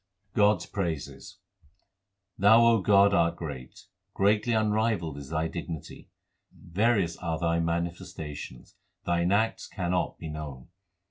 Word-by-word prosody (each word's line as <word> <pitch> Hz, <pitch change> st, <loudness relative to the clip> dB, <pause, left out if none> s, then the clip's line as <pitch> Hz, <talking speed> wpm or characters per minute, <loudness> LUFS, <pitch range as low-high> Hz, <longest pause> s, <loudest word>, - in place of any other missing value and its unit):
God 105 Hz, 0 st, +5 dB
s -, -, -8 dB
praises: 80 Hz, -8 st, -5 dB, 1.0 s
Thou, 110 Hz, +4 st, +6 dB
O 115 Hz, -3 st, +4 dB
God, 100 Hz, +1 st, +5 dB
art 85 Hz, -3 st, +2 dB
great; 70 Hz, -7 st, -8 dB, 0.3 s
greatly 105 Hz, +4 st, +2 dB
unrivalled 110 Hz, -7 st, +1 dB
is 70 Hz, -1 st, -10 dB
Thy 80 Hz, 0 st, -1 dB
dignity; 80 Hz, -1 st, -7 dB, 0.4 s
Various 95 Hz, -2 st, 0 dB
are 85 Hz, -2 st, -3 dB
Thy 85 Hz, 0 st, 0 dB
manifestations; 85 Hz, -5 st, -5 dB, 0.3 s
Thine 85 Hz, +1 st, +1 dB
acts 110 Hz, +3 st, +1 dB
cannot 90 Hz, 0 st, -2 dB
be 80 Hz, -, -7 dB
known. 75 Hz, -5 st, -7 dB
85 Hz, 120 wpm, -28 LUFS, 80-105 Hz, 1.0 s, Thou